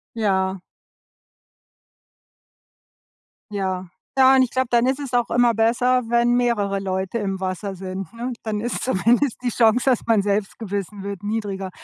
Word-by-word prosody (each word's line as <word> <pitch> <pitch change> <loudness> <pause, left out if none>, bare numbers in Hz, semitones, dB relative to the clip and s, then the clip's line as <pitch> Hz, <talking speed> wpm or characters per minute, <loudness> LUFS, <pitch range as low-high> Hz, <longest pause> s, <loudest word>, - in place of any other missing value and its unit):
Ja. 190 -3 0 2.9
Ja. 190 -2 -2 0.3
Ja, 265 0 +7
und 260 - +5
ich 245 - -1
glaube, 260 -1 0
dann 240 0 +4
ist 265 +2 0
es 270 -3 -6
auch 240 -1 +1
immer 240 -1 +3
besser, 245 +3 +2
wenn 240 +1 +3
mehrere 210 -5 +1
Leute 190 +2 -2
im 195 -3 -3
Wasser 190 +1 -3
sind, 190 0 -6
ne? 240 +2 -4
Dann 210 -2 -2
ist 240 - -3
zumindest 245 +3 +1
die 245 - +1
Chance, 235 +3 +3
dass 250 - +3
man 220 -3 +4
selbst 200 0 -1
gebissen 200 -2 -5
wird 200 -1 -5
niedriger. 205 -3 -3
220 Hz, 150 wpm, -22 LUFS, 195-240 Hz, 2.9 s, Ja